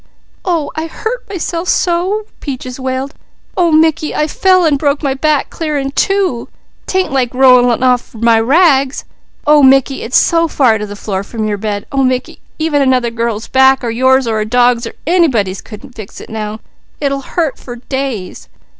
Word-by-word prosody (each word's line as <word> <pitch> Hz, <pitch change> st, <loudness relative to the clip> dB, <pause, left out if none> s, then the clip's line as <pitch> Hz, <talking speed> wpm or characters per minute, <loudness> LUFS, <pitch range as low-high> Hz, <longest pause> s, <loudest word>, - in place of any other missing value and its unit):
"Oh 335 Hz, -5 st, -1 dB
I 315 Hz, +1 st, -3 dB
hurt 450 Hz, +8 st, -5 dB
myself 350 Hz, -2 st, -3 dB
so!" 370 Hz, +4 st, 0 dB
Peaches 255 Hz, -2 st, -6 dB
wailed. 260 Hz, +2 st, -3 dB, 0.4 s
"Oh 345 Hz, -2 st, +2 dB
Mickey, 315 Hz, -1 st, +2 dB
I 300 Hz, -, +1 dB
fell 370 Hz, +3 st, +2 dB
an' 305 Hz, -3 st, +3 dB
broke 285 Hz, +1 st, -1 dB
my 275 Hz, -2 st, +1 dB
back 295 Hz, +1 st, 0 dB
clear 305 Hz, -3 st, -3 dB
in 275 Hz, -1 st, -2 dB
two. 375 Hz, -6 st, 0 dB, 0.4 s
'Tain't 375 Hz, -4 st, 0 dB
like 255 Hz, -3 st, 0 dB
rollin' 250 Hz, -2 st, +4 dB
off 250 Hz, -2 st, +1 dB
my 230 Hz, 0 st, +3 dB
rags; 275 Hz, +1 st, +2 dB, 0.4 s
oh 300 Hz, 0 st, +5 dB
Mickey, 270 Hz, 0 st, +3 dB
it's 245 Hz, -, +1 dB
so 335 Hz, 0 st, +3 dB
far 250 Hz, -8 st, +2 dB
to 210 Hz, -, -4 dB
the 205 Hz, -, -8 dB
floor, 195 Hz, -2 st, -4 dB
from 215 Hz, +1 st, -4 dB
your 205 Hz, -1 st, -2 dB
bed! 205 Hz, -1 st, -3 dB
Oh 275 Hz, -1 st, 0 dB
Mickey, 255 Hz, -1 st, -2 dB, 0.2 s
even 315 Hz, -2 st, 0 dB
another 255 Hz, -3 st, +1 dB
girl's 230 Hz, -1 st, -3 dB
back, 265 Hz, 0 st, +4 dB
or 235 Hz, -, -2 dB
yours, 260 Hz, +2 st, +3 dB
or 220 Hz, -2 st, -1 dB
a -, -, 0 dB
dog's, 245 Hz, 0 st, +2 dB
or -, -, -9 dB
anybody's 260 Hz, -, +1 dB
wouldn't 255 Hz, +4 st, -11 dB
fix 215 Hz, -4 st, -10 dB
it -, -, -11 dB
now. 215 Hz, 0 st, -5 dB, 0.4 s
It'll 275 Hz, -1 st, -1 dB
hurt 315 Hz, +1 st, -2 dB
for 245 Hz, -, -9 dB
days. 255 Hz, -5 st, -5 dB
265 Hz, 180 wpm, -14 LUFS, 235-310 Hz, 0.4 s, oh